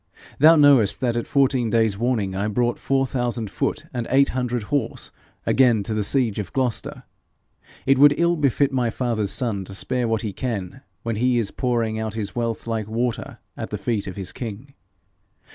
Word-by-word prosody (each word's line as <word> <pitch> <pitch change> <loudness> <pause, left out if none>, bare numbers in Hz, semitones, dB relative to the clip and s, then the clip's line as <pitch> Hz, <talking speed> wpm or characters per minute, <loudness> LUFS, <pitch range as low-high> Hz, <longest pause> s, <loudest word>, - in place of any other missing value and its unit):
Thou 160 +4 +8
knowest 140 -9 +5
that 120 -2 +1
at 120 - -2
fourteen 130 -4 +2
days' 110 -2 +2
warning 110 -3 -1
I 100 +2 -1
brought 120 +3 0
four 135 0 +1
thousand 120 -5 -2
foot - - -2
and 120 -2 -3
eight 140 +1 +4
hundred 125 -2 -2
horse 130 -6 -1 0.3
again 120 -6 +3
to 110 - -4
the 110 -1 0
siege 115 -2 +1
of 100 -3 -5
Gloucester. 130 -4 -2 0.8
It 135 0 +3
would 145 0 +7
ill 170 +1 +2
befit 140 -2 +1
my 125 -3 +1
father's 115 -4 -1
son 110 -4 0
to 95 - -8
spare 125 +3 -1
what 115 0 -1
he 105 -3 -3
can 115 -1 -4 0.2
when 115 -2 -2
he 125 +2 +2
is 110 -4 0
pouring 115 -4 -1
out 110 -1 -4
his 105 -3 -4
wealth 115 -2 -2
like 110 -2 -2
water 115 +2 -3 0.2
at - - -6
the - - -3
feet 110 -5 -2
of 95 - -6
his 95 -2 -5
king. 120 +4 -7
120 Hz, 190 wpm, -23 LUFS, 110-130 Hz, 0.8 s, Thou